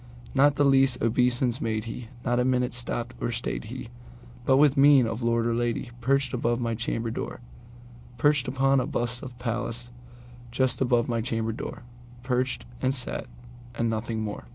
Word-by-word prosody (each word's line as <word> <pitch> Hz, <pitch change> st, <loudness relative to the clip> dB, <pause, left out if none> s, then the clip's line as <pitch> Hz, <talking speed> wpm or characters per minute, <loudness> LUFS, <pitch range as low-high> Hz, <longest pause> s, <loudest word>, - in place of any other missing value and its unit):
Not 140 Hz, +1 st, +4 dB
the 145 Hz, -, +3 dB
least 135 Hz, -2 st, +4 dB
obeisance 125 Hz, +1 st, +1 dB
made 110 Hz, -1 st, -1 dB
he; 115 Hz, +1 st, -7 dB, 0.2 s
not 120 Hz, -1 st, +2 dB
a -, -, +3 dB
minute 125 Hz, -1 st, +1 dB
stopped 120 Hz, 0 st, -1 dB
or -, -, 0 dB
stayed 110 Hz, -, -3 dB
he; -, -, -7 dB, 0.6 s
But, 130 Hz, -, +5 dB
with 145 Hz, -1 st, +5 dB
mien 140 Hz, -2 st, +6 dB
of 115 Hz, +1 st, -3 dB
lord 115 Hz, 0 st, +1 dB
or 120 Hz, -, +1 dB
lady, 120 Hz, 0 st, -1 dB
perched 135 Hz, +3 st, +1 dB
above 120 Hz, -1 st, 0 dB
my 115 Hz, -1 st, -1 dB
chamber 115 Hz, 0 st, -2 dB
door, -, -, -5 dB, 0.8 s
Perched 145 Hz, +1 st, +3 dB
upon 135 Hz, +1 st, +2 dB
a -, -, -1 dB
bust 120 Hz, 0 st, -2 dB
of 130 Hz, -3 st, -9 dB
Pallas 120 Hz, 0 st, -3 dB, 0.6 s
just 130 Hz, +1 st, 0 dB
above 120 Hz, -2 st, +2 dB
my 115 Hz, -1 st, 0 dB
chamber 115 Hz, -1 st, -1 dB
door:Perched, 125 Hz, +2 st, -4 dB, 0.2 s
and 130 Hz, +1 st, +1 dB
sat, 125 Hz, -2 st, -2 dB, 0.5 s
and 115 Hz, -1 st, 0 dB
nothing 110 Hz, 0 st, -2 dB
more. 105 Hz, -, -5 dB
120 Hz, 170 wpm, -27 LUFS, 115-130 Hz, 0.8 s, mien